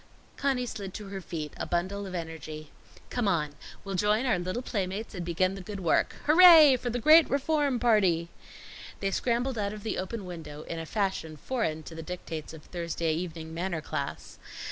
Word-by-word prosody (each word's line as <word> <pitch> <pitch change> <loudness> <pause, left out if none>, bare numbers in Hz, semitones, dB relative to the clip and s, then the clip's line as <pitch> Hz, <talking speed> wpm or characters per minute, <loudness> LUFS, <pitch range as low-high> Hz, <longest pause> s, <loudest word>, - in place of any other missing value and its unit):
Conny 270 -3 0
slid 200 -5 -6
to 210 -2 -7
her 195 -1 -5
feet, 155 -4 -5
a - - -4
bundle 190 +3 -1
of 185 - -6
energy. 155 -2 -6 0.4
"Come 245 -4 0
on! 155 -6 +1 0.3
We'll 195 - -5
join 210 +6 +2
our 220 -8 +2
little 185 +8 -3
playmates 200 -1 -3
and 180 -3 -4
begin 180 +2 +1
the 195 - -7
good 200 +2 -6
work 170 -4 +1
Hooray 315 -4 +9
for 245 - -3
the 240 - -1
great 310 +7 +7
Reform 280 -2 +1
Party!" 190 -8 +3 0.7
They 195 0 -1
scrambled 240 +2 0
out 200 0 -1
of 210 -1 -9
the 220 - -2
open 195 +2 -4
window, 155 -4 -8
in 165 - -5
a 165 - -6
fashion 190 -6 -2
foreign 160 - -2
to 165 - -10
the 160 - -6
dictates 160 -2 -6
of 160 -2 -11
Thursday 170 -2 -2
evening 160 -1 -5
manner 170 0 -2
class. 140 -2 -5
190 Hz, 190 wpm, -29 LUFS, 165-230 Hz, 0.7 s, Hooray